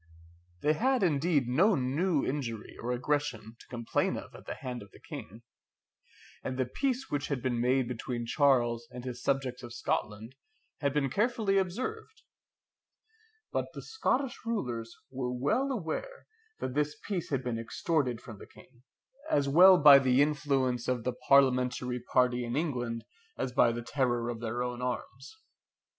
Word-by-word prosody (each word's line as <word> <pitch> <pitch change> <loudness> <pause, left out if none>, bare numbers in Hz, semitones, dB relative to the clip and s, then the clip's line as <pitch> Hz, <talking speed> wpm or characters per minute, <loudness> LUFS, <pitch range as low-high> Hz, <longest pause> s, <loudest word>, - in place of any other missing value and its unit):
They 150 - +3
had 255 +6 +1
indeed 150 -4 +2
no 180 - +4
new 145 +4 +1
injury 120 -6 -4
or 120 - -3
aggression 125 -4 -2
to - - -16
complain 120 -2 -1
of - - -9
at - - -13
the - - -4
hand 125 -2 -6
of 100 - -12
the - - -17
King, 110 +7 -9 1.0
and 130 - -3
the 130 - +1
peace 260 - -2
which 145 -1 -1
had 140 -3 -1
been 120 -2 0
made 125 +1 +2
between 120 0 -4
Charles 120 -4 +2
and 125 0 -9
his 125 -1 -5
subjects 135 -2 -1
of 120 -1 -9
Scotland 110 +1 -2 0.5
had 140 -1 +1
been 135 -2 0
carefully 210 - +2
observed; 255 - -4 1.3
but - - -1
the - - -7
Scottish 280 - -1
rulers 120 - -3 0.2
were 125 -2 -3
well 145 - 0
aware 260 - -4 0.3
that 130 - -3
this 150 +1 0
peace 190 -5 -2
had 135 -3 -1
been 120 -2 -2
extorted 125 +1 -1
from 110 -4 -10
the - - -11
King, 120 - -19 0.5
as 140 -1 +2
well 180 +6 +8
by 145 -3 +9
the 130 -1 +3
influence 140 -4 +1
of 125 -2 0
the 125 - -1
parliamentary 125 -2 +2
party 125 0 +1
in 120 0 -3
England, 125 -7 -2 0.3
as 130 - -2
by 120 -1 +4
the 120 0 -4
terror 120 -2 0
of 120 -2 -4
their 120 +1 -2
own 125 0 -4
arms. 125 - -5
130 Hz, 160 wpm, -30 LUFS, 120-150 Hz, 1.3 s, by